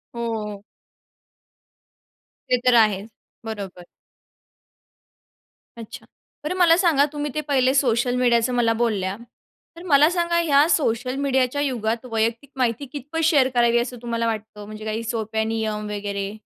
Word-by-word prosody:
हो. 215 -3 -4 1.9
ते 250 - +4
तर 250 -1 +5
आहेच. 215 -2 +3 0.4
बरोबर. 195 -5 -7 1.9
अच्छा. 230 +2 -10 0.4
बरं 305 +5 -2
मला 335 -2 +5
सांगा 330 -6 +3
तुम्ही 295 0 -3
ते 305 - 0
पहिले 260 -2 +2
सोशल 245 -2 +1
मीडियाचं 245 -1 +2
मला 235 -2 +2
बोलल्या, 210 -5 -1 0.6
तर 340 - -10
मला 300 -1 +5
सांगा 340 -1 0
ह्या 295 -2 +4
सोशल 255 -5 0
मीडियाच्या 270 0 0
युगात 235 -3 -2
वैयक्तिक 230 +4 -1
माहिती 250 +2 0
कितपत 300 +3 -4
शेअर 285 -5 +4
करावी, 235 0 +3
असं 245 +1 -4
तुम्हाला 230 -1 -2
वाटतं 215 -2 -5
म्हणजे 215 +1 -9
काही 220 +1 -3
सोप्या 220 -1 -2
नियम 220 -1 -2
वगैरे? 200 0 -4
235 Hz, 130 wpm, -22 LUFS, 220-280 Hz, 1.9 s, तर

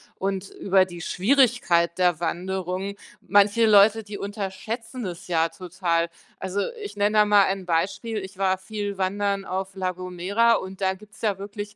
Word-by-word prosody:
und 195 0 -3
über 190 -1 +2
die 175 -2 -9
Schwierigkeit 195 - +2
der 175 -3 +2
Wanderung. 185 +2 -3 0.2
Manche 205 +5 +4
Leute, 215 +1 +6
die 205 0 -7
unterschätzen 215 +5 -5
das 185 -1 -6
ja 165 -2 +2
total. 170 -2 -1 0.3
Also, 190 +2 -2 0.2
ich 415 - -7
nenne 205 +1 +1
da 210 - +6
mal 205 -1 +6
ein 190 -1 -2
Beispiel: 195 +6 -1
Ich 190 0 -9
war 190 -1 +1
viel 205 +1 -5
wandern 200 +1 0
auf 190 0 -4
La 185 -1 -1
Gomera 185 +6 +1
und 190 -3 -3
da 190 -1 +1
gibt's 210 +2 -16
ja 210 -4 0
wirklich 205 +1 -7
195 Hz, 165 wpm, -24 LUFS, 185-205 Hz, 0.3 s, Leute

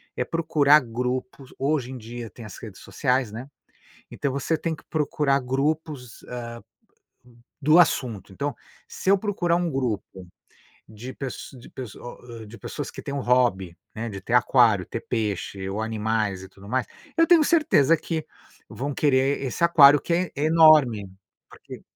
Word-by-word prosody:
é - - -1
procurar 155 -2 +4
grupos 125 +1 -5
hoje 135 -2 -1
em 130 - -6
dia 120 0 -8
tem 115 - -12
as 105 - -10
redes 105 -4 -10
sociais, 125 -4 -1
né. 120 +4 -7 0.6
Então 140 - -2
você 140 +4 -1
tem 165 0 -3
que - - -18
procurar 150 -3 +1
grupos, 135 -1 -3
ah, 120 -1 -6 1.1
do 155 +4 +5
assunto. 115 - +1
Então, 140 +5 -3 0.3
se - - -4
eu 200 - +6
procurar 190 -4 0
um 175 -1 -1
grupo 110 -8 -4 0.6
de 110 +4 -9
pess 135 -2 -7
de 120 - -14
pesso 125 -6 -9
o 120 - -10 0.2
hã, - - -10
de 110 +3 -12
pessoas 145 - -6
que - - -9
têm 140 - -5
um 140 - -2
hobby, 120 -9 +1 0.2
né, 115 +1 -4
de 100 - -7
ter 115 +5 -3
aquário, 120 -6 +4
ter 115 - -5
peixe, 100 -4 -3
ou 100 +3 -3
animais, 110 -3 -1
e 95 - -10
tudo 100 +1 -15
mais, 130 +2 -1 0.3
eu 330 - +6
tenho 335 -1 +6
certeza 285 - +4
que 160 0 -4 0.4
vão 140 +3 -5
querer 135 -1 +2
esse 135 +5 -1
aquário, 145 -4 +7
que - - -4
é 180 0 -1
enorme, 150 - +5 0.4
porque - - -12
130 Hz, 165 wpm, -24 LUFS, 115-150 Hz, 1.1 s, aquário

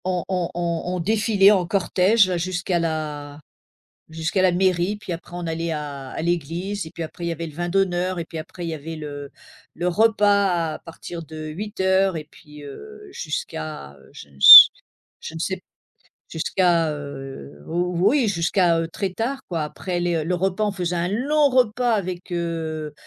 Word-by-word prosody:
On 180 -2 -1
on 180 -3 -1
on 170 -1 -2
on - - -3
défilait 205 +1 +3
en 185 -4 +1
cortège 190 +1 +2
jusqu'à 180 0 -2
la 150 -3 -4 0.7
jusqu'à 165 +4 -1
la 185 - +4
mairie, 180 +2 +1
puis 210 -3 -9
après 175 +1 -7
on 175 -1 -5
allait 165 +1 -3
à 145 -3 -6
à - - -5
l'église 175 +4 -2
et 160 - -10
puis - - -9
après 170 +2 -6
il - - -2
y - - -1
avait 165 0 -5
le 150 - -12
vin 175 +1 -3
d'honneur, 185 -1 0
et 165 - -4
puis 165 - -9
après 165 +3 -8
il 170 - -3
y 160 - -3
avait 160 +2 -8
le 145 -2 -8 0.4
le 175 +2 -3
repas 200 -4 +2
à - - -10
partir 165 0 -9
de 155 0 -8
20:00 190 +1 0
et 155 -2 -6
puis, 150 -2 -15
heu, 420 - -11
jusqu'à, 155 - -6
heu, - - -20
je - - -12
ne - - -21
s 485 +3 +12 0.5
je 470 - -8
ne - - -7
sais - - -2
p - - -23 0.7
jusqu'à, 170 0 +1
heu, 135 - -9
ou 175 +2 +1
oui 275 -5 +2
jusqu'à, 170 -1 +1
heu, 165 - -2
très 190 +2 -4
tard 260 +6 -3
quoi, 165 -4 -2
après 175 +4 -4
les, 175 -1 0
heu, 160 - -1
le 180 +4 -1
repas 190 +3 -1
on 205 - 0
faisait 180 -2 -3
un 170 0 -1
long 285 +8 +2
repas 245 -1 +2
avec, 185 -3 -4
heu, 160 -3 -4
175 Hz, 195 wpm, -22 LUFS, 160-195 Hz, 0.7 s, s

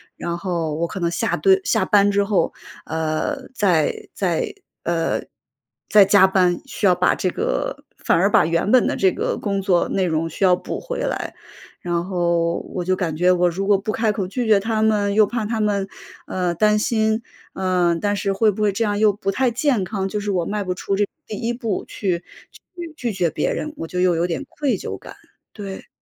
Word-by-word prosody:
然 170 0 -4
后 170 -4 -2
我 170 +2 -1
可 190 - -6
能 170 - +1
下 225 +6 0
对， 385 0 +4
下 - - +2
班 205 -1 +4
之 200 0 +2
后， 200 -2 +1 0.3
呃， 160 - -2
再 180 - +1
再 445 -5 -1 0.3
呃， 170 -1 0 0.7
再 210 -2 +7
加 195 -1 +6
班， 180 -2 +2
需 220 - -3
要 180 -2 +5
把 180 - +3
这 185 - -1
个 - - -2
反 - - +2
而 195 +4 +3
把 - - +5
原 170 +5 0
本 255 - +5
的 - - -1
这 190 -1 +3
个 - - -2
工 200 -2 -2
作 185 -3 +2
内 190 -1 +1
容 165 -1 -1
需 190 +5 0
要 180 - +5
补 - - -5
回 - - -5
来。 - - -3 0.5
然 175 -1 -1
后 170 -2 0
我 180 -2 -3
就 185 0 +2
感 165 -4 -2
觉 180 +1 +4
我 180 0 +3
如 195 +4 -3
果 205 - +5
不 200 +3 -3
开 220 -1 +1
口 195 -2 -2
拒 245 +2 -2
绝 210 -2 +5
他 220 +1 -1
们， 210 -2 +2
又 215 +1 +5
怕 230 -1 -2
他 225 +1 -2
们， 200 -2 0 0.4
呃， 180 -2 -2
担 210 +3 +3
心， 220 0 +1 0.3
呃， 180 -2 +1
但 205 0 +1
是 200 0 -1
会 215 +2 +3
不 210 +1 -3
会 210 -1 +3
这 225 +3 -1
样 205 0 0
又 215 0 +4
不 195 0 -4
太 250 +4 +1
健 250 -3 +1
康， 195 0 -3
就 210 +1 -3
是 205 0 -2
我 175 -3 0
迈 210 0 -2
不 185 -1 -2
出 195 +1 -2
这 205 - +2 0.2
第 215 - -5
1 235 +1 -2
步 230 -5 -3
去 180 -3 -2 0.5
去 340 -2 -7
拒 240 -6 -2
绝 180 -3 +1
别 - - -1
人， 305 0 -4
我 165 - -5
就 180 +1 -2
又 180 -2 +3
有 170 +2 +1
点 180 +11 -3
愧 285 -4 -1
疚 - - -5
感， - - -12 0.4
对。 200 -3 -8
195 Hz, 230 characters per minute, -21 LUFS, 180-215 Hz, 0.7 s, 再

